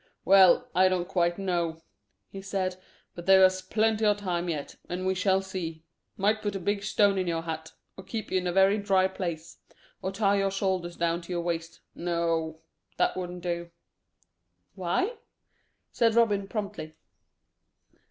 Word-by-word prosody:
"Well, 195 +5 +6
I 185 +1 +5
don't 180 -1 -1
quite 175 -2 +1
know," 170 -4 -2 0.5
he 195 - -7
said; 190 -1 -2 0.4
"but 175 +1 -10
there's 190 -1 +6
plenty 220 +3 +1
o' 210 -1 +4
time 180 -4 -2
yet, 150 -4 -4
and 180 +1 -3
we 190 - +2
shall 190 +1 +1
see. 165 -4 -5 0.3
Might 215 +2 +1
put 205 -1 -2
a - - -2
big 200 +3 -1
stone 205 -1 +2
in 185 - -1
your 165 -1 -1
hat; 160 -1 -6 0.2
or 190 - -10
keep 220 +3 -6
you 185 - +2
in 180 - -3
a - - 0
very 195 +3 +4
dry 195 -2 +3
place; 170 -4 -6 0.4
or 190 - -2
tie 200 0 +2
your 195 0 +1
shoulders 190 -3 -2
down 170 0 0
to 170 - -10
your 175 -1 -1
waist 165 -1 -4
no, 165 -2 -1 0.4
that - - +2
wouldn't 180 -1 -5
do." 170 -1 -3 1.0
"Why?" 365 - -1 0.7
said 230 -1 +2
Robin 205 -4 +3
promptly. 200 -7 -5
185 Hz, 160 wpm, -28 LUFS, 170-195 Hz, 1.0 s, Well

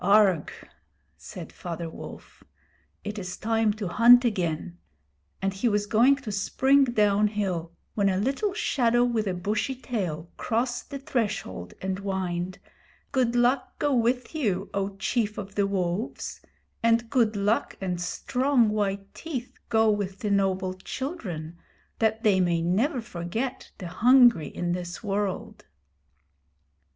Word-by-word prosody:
'Augrh!' 195 -4 +3 0.5
said - - -10
Father 170 -1 -5
Wolf, 160 - -11 0.6
'it 210 +1 -4
is 180 -1 -6
time 225 -1 +1
to 210 -2 -4
hunt 240 +6 +7
again'; 160 - -2 0.6
and 195 0 +1
he 200 +5 +1
was 205 -1 +1
going 235 +6 +5
to 275 -6 -7
spring 265 +7 +3
down 210 -4 +3
hill 185 -6 -2 0.2
when 200 -2 +2
a 185 - +1
little 270 - 0
shadow 240 - +2
with 230 -3 0
a 185 - -1
bushy 210 +8 -1
tail 185 - -3
crossed 240 +2 -1
the 280 - -5
threshold 210 - -3
and 190 0 -2
whined: 185 -2 -3 0.5
'Good 250 -3 +1
luck 245 +2 +2
go 290 -1 +1
with 245 +2 +1
you, 205 - -1
O 195 0 -2
Chief 210 +2 -1
of 195 -1 -6
the 200 -1 +1
Wolves; 190 +2 -3 0.4
and 230 0 +2
good 230 -5 +3
luck 205 +3 0
and 180 -2 -3
strong 250 +6 +1
white 200 -2 -2
teeth 265 -7 -6
go 220 -1 +4
with 195 -2 -3
the 210 - -1
noble 190 -2 +1
children, 185 - -6 0.4
that 220 0 +1
they 200 -3 +4
may 170 -2 +2
never 235 - +1
forget 225 +4 -4
the 190 - -8
hungry 240 - +5
in 175 0 -3
this 175 +3 -4
world.' 200 -2 -3
210 Hz, 140 wpm, -26 LUFS, 185-240 Hz, 0.6 s, hunt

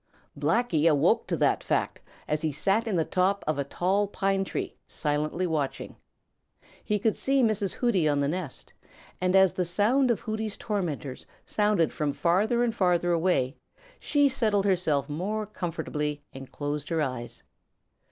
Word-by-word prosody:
Blacky 165 +1 +2
awoke 165 +10 +3
to - - -1
that - - +2
fact - - -1 0.3
as 150 0 -1
he 160 -1 0
sat 195 - 0
in 210 - 0
the 165 -2 +1
top 190 +2 +1
of 155 -2 -1
a - - +1
tall 190 +8 0
pine 195 -1 0
tree - - -4
silently 150 +4 -1
watching. 155 -5 -2 0.9
He 210 - 0
could 215 +1 +1
see 270 -1 +2
Mrs. 215 -3 +1
Hooty 195 -11 +2
on 145 -1 +1
the 140 - +1
nest, 165 -3 -5 0.5
and 185 +1 +2
as 190 -2 +6
the - - -2 0.2
noise 250 +6 +3
of 235 - +1
Hooty's 220 -1 -3
tormentors 160 - -4 0.2
sounded 210 -6 +1
from 150 -2 -1
farther 210 - +2
and 235 -2 0
farther 175 -4 +2
away, 160 -6 +1 0.4
she 285 -1 +3
settled 215 -7 +1
herself 160 -8 +1
more 200 +8 -2
comfortably 150 -6 -4
and 135 0 -10
closed 145 0 -4
her 165 -1 0
eyes. 125 -4 -5
180 Hz, 160 wpm, -27 LUFS, 150-210 Hz, 0.9 s, as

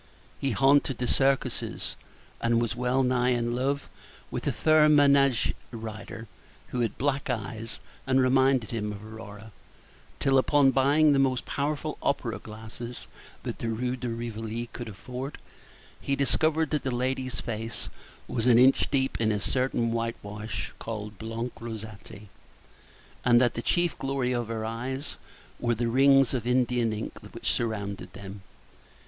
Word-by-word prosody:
He 140 - 0
haunted 135 +2 +3
the 125 - -1
circuses, 135 +2 +1 0.5
and 115 0 +3
was 115 -1 -1
wellnigh 125 0 +2
in 120 0 -1
love 140 +3 -1 0.4
with - - -3
a - - +3
fair 155 -1 +5
manége 140 -4 +5 0.2
rider, 115 0 -7 0.4
who 125 - -3
had 115 -2 -1
black 140 0 0
eyes, 110 +1 -4 0.3
and 130 0 +4
reminded 130 -2 +3
him 105 -3 -2
of 105 +1 -8
Aurora; 110 -1 -10 0.7
till, 135 -1 +4
upon 140 0 +4
buying 145 +3 +4
the 140 - +3
most 130 -2 +2
powerful 150 +1 -2
opera 130 -5 -1
glass 110 +1 -10 0.6
that - - -5
the 115 - -2
Rue 125 +3 -1
de 125 -1 -4
Rivoli 115 0 -4
could 120 - -6
afford, 125 +7 -6 0.6
he 140 - 0
discovered 155 +3 +2
that 150 -2 +1
the 135 - -2
lady's 130 +1 -1
face 115 0 -4 0.4
was 115 +1 -1
an 120 -2 +7
inch 130 +2 +5
deep 135 -3 0
in 110 -1 +3
a 105 - 0
certain 120 +1 0
whitewash 110 -2 -4
called 105 -3 -6
blanc 115 +2 -4
rosati, 110 -2 -8 0.9
and 120 -1 +6
that 120 -1 +3
the 120 - -3
chief 175 +5 +1
glory 135 -2 0
of 120 -2 -1
her 110 -1 -3
eyes 130 +5 -4 0.4
were 120 -1 +1
the 120 +1 -1
rings 135 +2 +5
of 120 -3 -2
Indian 125 -2 +2
ink 110 +1 -5
which - - -1
surrounded 100 -5 -3
them. 95 0 -9
120 Hz, 150 wpm, -28 LUFS, 115-135 Hz, 0.9 s, an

